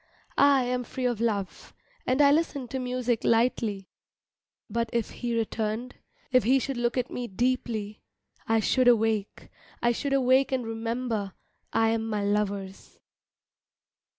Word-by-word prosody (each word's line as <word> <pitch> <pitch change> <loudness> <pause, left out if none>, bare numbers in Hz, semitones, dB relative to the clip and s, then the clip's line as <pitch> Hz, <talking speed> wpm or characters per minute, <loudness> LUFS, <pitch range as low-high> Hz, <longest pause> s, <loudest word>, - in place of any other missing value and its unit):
I 275 -2 +4
am 250 0 -1
free 255 +2 -5
of 240 -3 0
love, 205 -5 -3 0.3
and 260 +3 +3
I 280 - +6
listen 290 -4 0
to 265 - -3
music 250 -2 -1
lightly, 225 -4 +1 0.8
But 230 0 -2
if 235 -2 -1
he 240 -2 -3
returned, 225 +2 -2 0.4
if 255 -1 +4
he 260 +4 +4
should 270 +1 -2
look 240 +1 0
at 250 -1 -1
me 245 -1 -4
deeply, 220 -1 -2 0.5
I 225 0 +3
should 255 +3 +2
awake, 220 -3 +1 0.3
I 240 - +2
should 275 +4 -2
awake 265 0 +3
and 255 -3 -1
remember 225 -2 -3 0.4
I 225 0 +3
am 225 0 -1
my 210 -2 -1
lover's. 200 -2 -2
235 Hz, 145 wpm, -27 LUFS, 220-255 Hz, 0.8 s, I